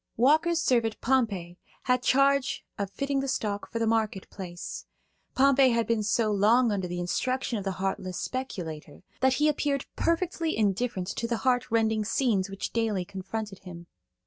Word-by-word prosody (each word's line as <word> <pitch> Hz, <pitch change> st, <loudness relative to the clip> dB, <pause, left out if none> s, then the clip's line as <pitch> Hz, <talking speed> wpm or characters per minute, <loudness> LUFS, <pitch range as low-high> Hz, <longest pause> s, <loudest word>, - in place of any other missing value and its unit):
Walker's 315 Hz, +7 st, +4 dB
servant 230 Hz, -3 st, +1 dB
Pompey 200 Hz, -9 st, 0 dB, 0.2 s
had 250 Hz, -1 st, +2 dB
charge 275 Hz, +1 st, +2 dB
of 200 Hz, -1 st, -2 dB
fitting 275 Hz, +6 st, -1 dB
the 270 Hz, -, -2 dB
stock 205 Hz, -5 st, -2 dB
for -, -, -3 dB
the 230 Hz, -, +1 dB
market 220 Hz, -4 st, 0 dB
place. 175 Hz, -3 st, -7 dB, 0.5 s
Pompey 270 Hz, 0 st, +5 dB
had 230 Hz, -1 st, +1 dB
been 230 Hz, -2 st, +1 dB
so 215 Hz, +1 st, +1 dB
long 220 Hz, +4 st, +4 dB
under 190 Hz, -3 st, -1 dB
the 175 Hz, 0 st, -4 dB
instructions 250 Hz, +6 st, -1 dB
of 200 Hz, -, -7 dB
the 195 Hz, -, 0 dB
heartless 190 Hz, -1 st, -3 dB
speculator 180 Hz, -13 st, -5 dB, 0.2 s
that 260 Hz, 0 st, +3 dB
he 300 Hz, -, +3 dB
appeared 285 Hz, -2 st, 0 dB
perfectly 335 Hz, -1 st, 0 dB
indifferent 205 Hz, -2 st, 0 dB
to 230 Hz, -, -3 dB
the 235 Hz, -1 st, -1 dB
heart 250 Hz, -1 st, +2 dB
rending 220 Hz, -1 st, +2 dB
scenes 210 Hz, -4 st, +1 dB
which 195 Hz, 0 st, -5 dB
daily 220 Hz, -5 st, 0 dB
confronted 195 Hz, +1 st, -6 dB
him. 175 Hz, -2 st, -10 dB
225 Hz, 165 wpm, -28 LUFS, 195-260 Hz, 0.5 s, Pompey